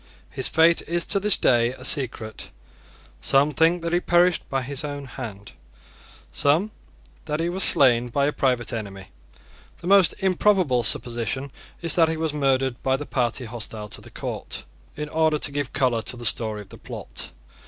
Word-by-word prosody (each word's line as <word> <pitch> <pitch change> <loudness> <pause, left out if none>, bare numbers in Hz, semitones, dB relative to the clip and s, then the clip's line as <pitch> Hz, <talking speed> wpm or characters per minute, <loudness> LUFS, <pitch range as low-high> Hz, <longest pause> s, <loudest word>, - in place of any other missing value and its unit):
His - - -1
fate 165 +1 +4
is 170 +1 0
to 200 - +1
this 210 0 +1
day 120 0 +3
a 130 0 -10
secret. 120 -6 0 0.7
Some 140 - +3
think 165 +3 +2
that 170 0 -2
he 175 - +3
perished 175 0 +3
by 135 -1 -1
his 140 +2 -5
own 145 -1 -5
hand; 110 -6 -8 0.8
some, 160 +9 +1 0.5
that 150 -1 -2
he 165 +1 0
was 185 +2 -3
slain 125 -3 +5
by 140 +4 0
a 145 - 0
private 125 -4 0
enemy. 100 -4 -6 0.7
The - - -12
most 195 0 +5
improbable 185 -8 +2
supposition 120 +4 0 0.3
is 165 -3 +3
that 165 -2 +5
he 160 - -2
was 160 -2 -2
murdered 135 -3 0
by 135 0 +1
the 145 - -6
party 125 -1 -1
hostile 110 -2 -7
to - - -5
the - - -14
court, - - -6 0.3
in 150 0 -5
order 160 0 +1
to 145 - +3
give 145 -2 -3
colour 125 -5 +1
to 120 - -3
the 120 - -7
story 110 -2 0
of 100 - -14
the - - -13
plot. - - -7
140 Hz, 180 wpm, -24 LUFS, 120-160 Hz, 0.8 s, slain